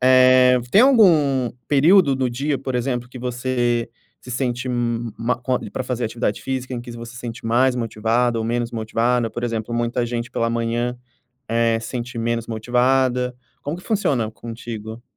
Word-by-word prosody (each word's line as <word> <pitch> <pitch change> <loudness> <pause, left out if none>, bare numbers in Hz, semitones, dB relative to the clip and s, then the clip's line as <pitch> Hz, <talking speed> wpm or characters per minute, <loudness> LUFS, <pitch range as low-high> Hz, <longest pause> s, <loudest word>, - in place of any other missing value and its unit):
eh, 130 0 +6
tem 205 - +7
algum 160 - +5 0.2
período 150 0 +5
do 130 -1 0
dia, 140 +4 -1
por 130 0 -4
exemplo, 125 0 -1
que 125 - -10
você 120 -1 -1 0.3
se 125 - -11
sente 125 0 -2
ma 120 -1 -1
com 125 +1 -1
pra - - -3
fazer 125 -1 -2
atividade 110 -1 -2
física, 130 -1 -3
em 120 - -4
que 120 0 -10
você 115 0 -9
se 120 - -10
sente 120 -1 -7
mais 125 +3 +3
motivada 115 +1 0
ou 110 - -2
menos 120 +1 -1
motivada? 115 +1 0
Por 120 - -4
exemplo, 115 -1 -3
muita 120 +1 0
gente 120 0 -4
pela 115 0 0
manhã, 115 +1 -1 0.5
eh, 115 0 +2
sente 120 +1 -5
menos 115 0 -1
motivada. 125 +2 +1 0.3
Como 145 +4 -3
que 180 - -12
funciona 140 - 0
contigo? 115 0 -8
120 Hz, 165 wpm, -21 LUFS, 115-130 Hz, 0.5 s, tem